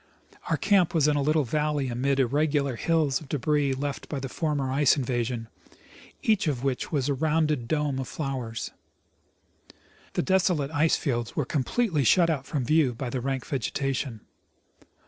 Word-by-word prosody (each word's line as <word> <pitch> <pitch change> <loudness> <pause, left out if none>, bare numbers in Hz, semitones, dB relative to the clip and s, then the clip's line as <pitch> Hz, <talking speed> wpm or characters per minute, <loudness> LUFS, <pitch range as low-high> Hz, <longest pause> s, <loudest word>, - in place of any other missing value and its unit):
Our - - +2
camp 190 -5 +3
was 155 -2 +4
in 150 - +3
a 145 - +1
little 155 +2 +2
valley 150 +1 0
amid 135 +3 0
irregular 140 +1 +1
hills 155 0 +1
of 145 - -13
debris 145 -1 +1
left 140 +1 -4
by 145 - -3
the 135 0 -5
former 145 -3 -1
ice 140 +1 +4
invasion, 120 -3 -2 0.8
each 215 -6 +2
of 135 -4 -1
which 135 -2 -2
was 140 -4 0
a 145 - +1
rounded 150 -3 0
dome 150 -2 0
of 130 - -4
flowers. 130 -6 -4 1.4
The - - 0
desolate 180 -6 +1
ice 160 +1 +3
fields 120 -5 -2
were 150 - 0
com 135 +1 -1
pletely 185 - 0
shut 170 +6 +4
out 140 -4 -3
from 140 -5 -2
view 150 -4 +3
by 125 0 -4
the 130 - -2
rank 135 0 -2
vegetation. 135 -3 -2
140 Hz, 165 wpm, -27 LUFS, 130-155 Hz, 1.4 s, was